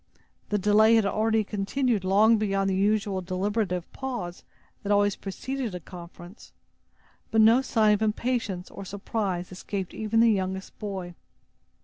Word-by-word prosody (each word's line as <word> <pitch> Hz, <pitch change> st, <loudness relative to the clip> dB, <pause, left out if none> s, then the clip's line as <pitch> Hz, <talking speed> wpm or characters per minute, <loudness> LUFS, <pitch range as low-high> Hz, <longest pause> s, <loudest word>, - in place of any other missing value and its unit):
The 210 Hz, -, +1 dB
delay 210 Hz, +3 st, +5 dB
had 220 Hz, -2 st, +3 dB
already 220 Hz, +2 st, +1 dB
continued 210 Hz, +2 st, -1 dB
long 210 Hz, +4 st, +4 dB
beyond 195 Hz, -2 st, 0 dB
the -, -, 0 dB
usual 200 Hz, -1 st, +1 dB
deliberative 185 Hz, 0 st, -2 dB
pause 240 Hz, -10 st, -5 dB, 0.4 s
that 205 Hz, -, -3 dB
always 205 Hz, -1 st, +3 dB
preceded 240 Hz, +2 st, -5 dB
a -, -, -4 dB
conference; 175 Hz, +3 st, -12 dB, 0.8 s
but 225 Hz, -, +1 dB
no 225 Hz, +4 st, +6 dB
sign 220 Hz, -5 st, +3 dB
of 210 Hz, -, -1 dB
impatience 215 Hz, -4 st, -1 dB
or -, -, -8 dB
surprise 195 Hz, -2 st, -3 dB
escaped 185 Hz, 0 st, -5 dB
even 220 Hz, +1 st, 0 dB
the 230 Hz, 0 st, +6 dB
youngest 190 Hz, -1 st, -3 dB
boy. 190 Hz, -4 st, -5 dB
205 Hz, 140 wpm, -26 LUFS, 190-220 Hz, 0.8 s, no